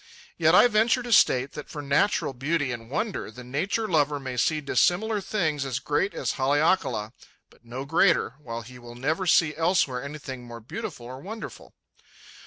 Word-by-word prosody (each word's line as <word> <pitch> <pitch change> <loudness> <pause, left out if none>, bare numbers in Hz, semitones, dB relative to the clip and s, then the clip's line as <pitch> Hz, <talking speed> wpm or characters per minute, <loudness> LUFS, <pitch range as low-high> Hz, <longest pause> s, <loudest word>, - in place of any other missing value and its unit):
Yet - - +4
I - - +8
venture 230 +2 +2
to 240 -1 -1
state 130 -8 +4
that 150 - -9
for 150 - -7
natural 140 +2 +1
beauty 145 +1 -1
and 115 -1 -7
wonder 205 - -3
the 125 +3 -11
nature 180 - -1
lover 150 -4 +1
may 130 -2 -5
see 155 +5 +1
dissimilar 200 +8 +1
things 165 -8 -1
as 130 -3 -2
great 145 +8 -1
as - - -1
Haleakala, 135 - +1 0.4
but - - -24
no 125 +3 -6
greater, 165 - +3
while 115 -5 -6
he 125 +2 -12
will 120 0 -11
never 160 +9 -1
see 160 -2 +4
elsewhere 160 -7 +1
anything 140 -3 -7
more 120 -1 -9
beautiful 120 +1 -7
or 130 +2 -8
wonderful. 215 +6 -9
145 Hz, 175 wpm, -26 LUFS, 125-180 Hz, 0.4 s, I